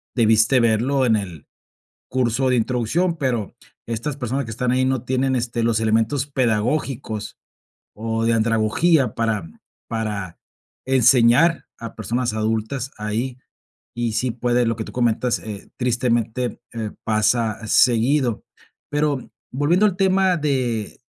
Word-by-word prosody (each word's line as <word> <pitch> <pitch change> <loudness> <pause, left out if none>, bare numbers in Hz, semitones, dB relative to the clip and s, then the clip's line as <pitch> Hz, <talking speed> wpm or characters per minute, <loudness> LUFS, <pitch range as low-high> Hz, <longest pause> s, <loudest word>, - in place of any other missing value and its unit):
debiste 110 +2 +4
verlo 120 +4 +2
en 115 -3 +3
el 90 -7 -5 0.6
curso 130 0 +1
de 125 - +2
introducción, 125 +9 0
pero, 125 -9 -2 0.3
estas 120 +5 -3
personas 135 +1 -2
que 115 - -8
están 125 +3 -1
ahí 130 +1 +2
no 130 -2 0
tienen, 130 +1 0
este, 120 -1 -2
los 115 -1 +2
elementos 115 +5 +1
pedagógicos 115 -3 -1 0.6
o 115 +1 -2
de 115 - +2
andragogía 115 +5 +2
para 110 -5 -1 0.4
para 105 -6 -4 0.5
enseñar 130 +5 +4
a 115 -1 -8
personas 115 +3 -2
adultas 110 +4 -2
ahí. 115 +5 -3 0.6
Y 120 -1 -1
sí 125 +4 0
puede, 120 +1 +1
lo 115 - 0
que 110 - -4
tú - - -10
comentas, 120 0 +1
eh, 105 -2 -9
tristemente, 120 -1 -1
eh, 110 -2 -4
pasa 110 +1 +1
seguido. 120 +1 +3 0.5
Pero 145 -3 -1 0.2
volviendo 155 +10 +2
al 195 - -1
tema 190 -1 +3
de 130 -8 -2
120 Hz, 130 wpm, -21 LUFS, 110-130 Hz, 0.6 s, debiste